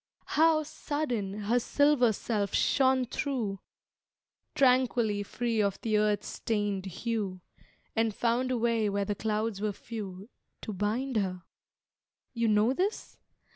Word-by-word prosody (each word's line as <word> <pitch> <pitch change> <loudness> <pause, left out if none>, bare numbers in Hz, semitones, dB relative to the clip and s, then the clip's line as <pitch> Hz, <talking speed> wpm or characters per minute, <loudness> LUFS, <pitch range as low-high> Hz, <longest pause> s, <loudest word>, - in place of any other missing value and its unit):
How, 315 0 +4
sudden, 250 -10 -3
her 230 +4 +2
silver 285 -2 +3
self 205 -2 -2
shone 260 -1 +3
thro, 230 -7 -2 1.0
Tranquilly 250 -5 +3
free 230 +2 -1
of 200 -2 0
the 215 -2 +1
earth's 210 -1 +1
stained 205 -3 -2
hue, 200 -1 -3 0.6
And 225 0 +2
found 240 +4 0
a 255 - 0
way 230 -2 +1
where 200 0 0
the 205 - -1
clouds 215 0 -2
were 210 -1 0
few 200 -3 -7 0.4
To 215 - -4
bind 220 +6 -1
her? 185 -3 -1 0.9
You 230 -2 0
know 215 +3 +3
this? 385 +9 -2
225 Hz, 130 wpm, -29 LUFS, 205-250 Hz, 1.0 s, How